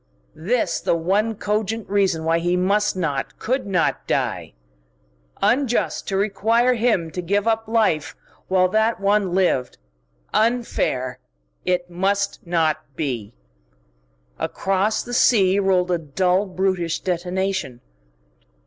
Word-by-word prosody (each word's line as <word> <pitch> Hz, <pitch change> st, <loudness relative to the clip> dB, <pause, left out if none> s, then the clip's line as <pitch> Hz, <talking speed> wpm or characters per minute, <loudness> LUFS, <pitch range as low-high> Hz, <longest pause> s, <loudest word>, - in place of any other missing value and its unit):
This 185 Hz, +1 st, -1 dB
the -, -, +1 dB
one 200 Hz, +7 st, 0 dB
cogent 215 Hz, +1 st, -2 dB
reason 190 Hz, -5 st, +1 dB
why 165 Hz, +1 st, +2 dB
he 175 Hz, +1 st, 0 dB
must 200 Hz, +3 st, +1 dB
not, 150 Hz, -7 st, -2 dB
could 255 Hz, -1 st, -2 dB
not, 180 Hz, -4 st, 0 dB
die.... -, -, -1 dB, 0.9 s
Unjust 250 Hz, -1 st, +1 dB
to 195 Hz, -, -1 dB
require 220 Hz, +5 st, +2 dB
him 220 Hz, -9 st, +1 dB
to 180 Hz, -, -4 dB
give 200 Hz, +5 st, 0 dB
up 225 Hz, -1 st, +1 dB
life 215 Hz, -10 st, +1 dB, 0.3 s
while 185 Hz, -1 st, +3 dB
that 220 Hz, +3 st, +1 dB
one 200 Hz, -2 st, +1 dB
lived. 175 Hz, -10 st, +1 dB, 0.6 s
Unfair.... 215 Hz, -, 0 dB, 0.5 s
It 180 Hz, -1 st, -1 dB
must 200 Hz, +3 st, -1 dB
not 160 Hz, -3 st, +2 dB, 0.2 s
be!... 125 Hz, -, -4 dB, 1.0 s
Across 195 Hz, +3 st, 0 dB
the 245 Hz, -, -8 dB
sea 200 Hz, -6 st, +4 dB
rolled 185 Hz, -2 st, +2 dB
a 175 Hz, -, +1 dB
dull, 180 Hz, +6 st, 0 dB
brutish 185 Hz, -3 st, -1 dB
detonation. 185 Hz, -5 st, -2 dB
190 Hz, 120 wpm, -22 LUFS, 175-215 Hz, 1.0 s, sea